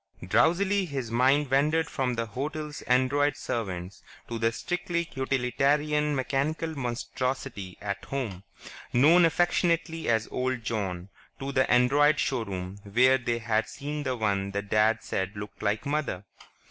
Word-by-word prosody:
Drowsily 190 - +3
his 135 -8 -4
mind 130 +4 +3
wandered 155 +4 +3
from 130 -3 -1
the 115 0 -1
hotel's 150 +6 -5
android 145 +3 +2
servants... 95 - -4 0.3
to 115 -1 -4
the 115 0 +2
strictly 170 +5 -2
utilitarian 145 +3 +1
mechanical 145 +5 -1
monstrosity 125 -5 -3
at 100 -1 -4
home, 115 -10 -4 0.5
known 160 +8 +6
affectionately 165 -1 +1
as 110 -1 +2
"Old 130 -2 -1
John"... 95 -5 -3 0.3
to 135 0 -4
the 130 -1 +2
android 145 +4 +4
showroom 100 -8 -2
where 125 +6 +4
they 120 -1 -1
had 110 -1 0
seen 150 +1 -5
the 130 -3 -2
one 100 -3 0
that 100 0 -4
Dad 110 +1 +3
said 95 +2 -3
looked 105 0 -8
like 105 0 0
Mother.... 140 -10 -2
130 Hz, 135 wpm, -27 LUFS, 110-145 Hz, 0.5 s, known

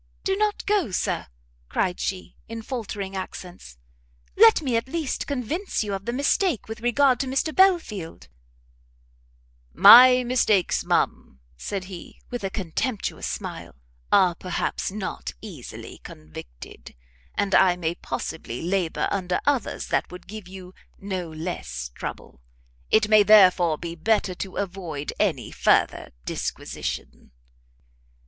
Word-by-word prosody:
"Go 385 - +2
not 420 +1 0
so, 405 - +2
Sir!" 180 - -2 0.4
cried 180 -2 -1
she, 185 -1 -4
in 230 0 -6
faltering 210 -6 -5
accents; 180 - -8 0.6
"let 445 -5 +6
me 255 -4 0
at 230 +3 0
least 315 -1 -3
convince 285 - -2
you 205 -1 -4
of 195 0 -5
the 235 - -1
mistake 285 - 0
with 220 +1 -7
regard 250 +1 +3
to 270 - -1
Mr 270 +4 -1
Belfield 335 - +1 0.8
" - - -36 0.2
"My 250 +1 +9
mistakes, 235 -6 +2
ma'am," 65 - -1 0.2
said 195 - -4
he, 185 -2 -10
with 245 -3 -4
a 195 - -1
contemptuous 195 +4 -3
smile, - - -6 0.4
"are 185 -3 +5
perhaps 180 +1 -3
not 200 -1 -5
easily 175 - -10
convicted: - - -12 0.4
and 200 -1 -1
I 180 -2 +5
may 170 -2 -2
possibly 160 -7 -5
labour 180 -1 0
under 180 -2 -1
others 285 -4 0
that - - 0
would 180 - -10
give 215 -2 -9
you 185 -1 -11 0.2
no 190 -4 -4
less 115 - -5
trouble: - - -8 0.5
it 215 -1 +4
may 215 0 +6
therefore 185 -6 +6
be 170 +1 -6
better 190 +2 +1
to 190 +1 -7
avoid 175 -7 -4
any - - 0
further - - +2 0.2
disquisition." - - -5
195 Hz, 130 wpm, -24 LUFS, 175-245 Hz, 0.8 s, My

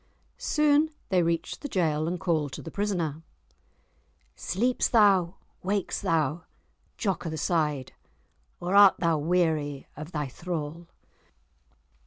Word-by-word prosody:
Soon 300 +1 +3 0.2
they 185 -2 +3
reached 165 0 -1
the 290 - -4
jail, 160 -6 0
and 175 +1 -2
called 155 -6 0
to - - -7
the 165 - -8
prisoner, 175 -7 -2 1.1
"Sleeps 245 +7 0
thou, 195 -6 +4 0.3
wakes 200 +1 -1
thou, 160 0 0 0.5
Jock 195 -4 -2
o' - - -1
the 160 - -4
Side, 150 -5 -1 0.7
Or 180 +2 -3
art 200 -1 +8
thou 165 -3 +1
weary 155 -4 0
of 150 +3 -8
thy 150 -3 -2
thrall?" 165 +2 -5
170 Hz, 125 wpm, -27 LUFS, 155-190 Hz, 1.1 s, art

